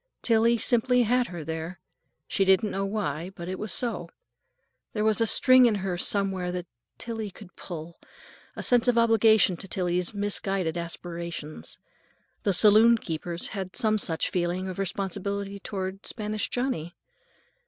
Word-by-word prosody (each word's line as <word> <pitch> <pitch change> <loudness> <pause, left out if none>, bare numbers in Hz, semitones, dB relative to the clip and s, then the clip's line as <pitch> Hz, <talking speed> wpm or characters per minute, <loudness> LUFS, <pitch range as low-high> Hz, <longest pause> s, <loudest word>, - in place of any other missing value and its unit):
Tillie 230 0 +3
simply 245 +2 +2
had 245 +2 +1
her, 175 -3 -7
there. 160 +3 -5 0.5
She 195 - +1
didn't 190 +2 +3
know 195 0 -2
why, 185 -5 -3
but 170 -1 -8
it 185 0 -5
was 215 -2 -3
so. 240 +3 -1 0.8
There 210 - -1
was 220 +1 +3
a 225 - +3
string 255 +2 +6
in 220 - +1
her 190 -2 -2
somewhere 190 0 0
that 180 -1 -4 0.3
Tillie 225 -3 -5
could 185 -2 -15
pull; 170 -1 -8 0.6
a - - -6
sense 245 -1 +3
of 245 -1 +3
obligation 220 -5 +4
to 195 - -6
Tillie's 180 -1 -1
misguided 195 -4 -1
aspirations. 170 -2 -6 0.6
The 200 - +1
saloon 215 +5 +6
keepers 170 -2 -3
had 190 -3 -6
some 215 -1 +2
such 165 -5 0
feeling 180 +1 -1
of 185 0 -6
responsibility 200 +1 -3
toward 195 0 -5
Spanish 215 -1 -3
Johnny. 245 - -3
195 Hz, 150 wpm, -26 LUFS, 175-220 Hz, 0.8 s, string